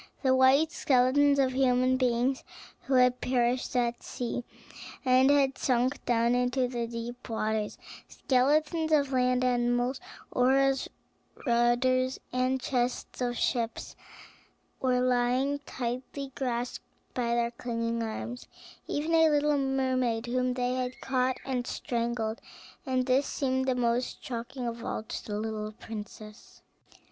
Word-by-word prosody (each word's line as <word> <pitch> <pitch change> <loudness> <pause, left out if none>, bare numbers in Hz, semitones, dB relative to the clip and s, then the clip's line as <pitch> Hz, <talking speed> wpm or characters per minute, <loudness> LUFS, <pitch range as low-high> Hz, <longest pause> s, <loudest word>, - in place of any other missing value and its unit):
The 260 -1 +4
white 270 +4 +5
skeletons 280 +1 +3
of 265 -2 +3
human 255 -1 +3
beings 255 +1 +1 0.4
who 270 - +1
had 250 0 +4
perished 250 0 0
at 240 -1 0
sea, 245 0 -4 0.6
and 260 +1 +5
had 275 -2 +3
sunk 255 +2 +1
down 235 0 +3
into 250 +1 +1
the 240 -2 -3
deep 240 +2 -7
waters, 220 -1 -2 0.3
skeletons 305 +4 +1
of 285 -3 +3
land 250 0 +2
animals, 245 +1 +1 0.3
oars, 270 +1 +2 0.6
rudders, 255 +2 +2
and 255 +1 +1
chests 250 -1 -2
of 245 -1 -1
ships 235 -2 -2 0.8
were 250 -1 +1
lying 255 +3 +1
tightly 255 +3 -4
grasped 245 -2 -3 0.3
by 235 -1 0
their 235 0 +1
clinging 230 -1 -3
arms; 230 +2 -5 0.4
even 310 +3 -1
a 325 -1 +6
little 295 -1 +2
mermaid, 260 -4 0
whom 250 +1 0
they 250 0 0
had 255 0 -3
caught 260 -1 0
and 250 -2 -2
strangled; 235 -2 -2 0.5
and 255 -1 +1
this 265 +2 +2
seemed 260 -1 -1
the 260 - +2
most 245 0 -1
shocking 245 +1 -5
of 230 0 -5
all 215 - -3
to 220 - -6
the 210 -1 -3
little 215 -1 -4
princess. 215 0 -10
250 Hz, 130 wpm, -29 LUFS, 240-260 Hz, 0.8 s, a